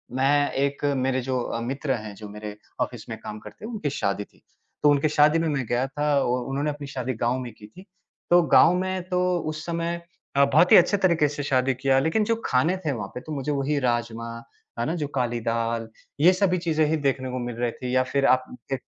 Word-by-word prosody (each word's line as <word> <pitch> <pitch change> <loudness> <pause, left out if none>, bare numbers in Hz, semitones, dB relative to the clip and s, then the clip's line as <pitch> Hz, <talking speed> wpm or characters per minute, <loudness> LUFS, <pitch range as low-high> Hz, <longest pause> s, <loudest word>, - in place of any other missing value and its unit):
मैं 145 +2 +2
एक 140 +1 -1 0.2
मेरे 130 0 +1
जो 125 -2 -2
मित्र 135 +4 -3
हैं, 110 -4 -5
जो 105 +1 -9
मेरे 105 0 -7 0.2
ऑफ़िस - - -3
में - - -5
काम 105 - -7
करते 160 - -11
हैं, 230 - -6
उनकी 205 -10 -2
शादी 100 -6 -1
थी - - -24 0.4
तो 150 - +6
उनके 145 +1 +3
शादी 150 +2 +4
में 165 - 0
मैं 135 -4 -1
गया 120 +3 +1
था, 145 +2 -4 0.2
और 125 0 0
उन्होंने 140 +2 -1
अपनी 145 -1 -6
शादी 130 -2 -3
गाँव 120 +2 +1
में 125 -2 -6
की 105 -1 -14
थी। 185 - -15 0.4
तो 175 0 +6
गाँव 175 - +6
में 185 0 -2
तो 180 -1 +1 0.3
उस 155 0 -6
समय 170 0 -2 0.4
बहुत 140 +5 +5
ही - - +10
अच्छे 180 +3 +4
तरीके 170 -6 +3
से 145 0 -5
शादी 130 -1 +2
किया 135 +1 +2
लेकिन 160 +10 +1
जो 230 +2 +1
खाने 145 +9 +2
थे 150 - +1
वहाँ 105 -7 -4
पे 125 - -5
तो 155 - -9
मुझे 140 0 -2
वही 145 +1 0
राजमा, 120 -2 -1 0.5
है 120 - 0
ना? 160 - -1
जो 150 -4 -2
काली 120 -2 0
दाल, 115 0 -1 0.3
ये 175 +5 +6
सभी 185 -1 +2
चीज़ें 160 -3 +1
ही 160 - +1
देखने 135 -3 -1
को 130 - -3
मिल 120 -1 -5
रही 120 0 -1
थी 125 +2 -4
या 130 - +4
फिर 135 +2 0
आप 130 -1 +4 0.3
एक 135 - -3
135 Hz, 230 wpm, -25 LUFS, 125-155 Hz, 0.5 s, ही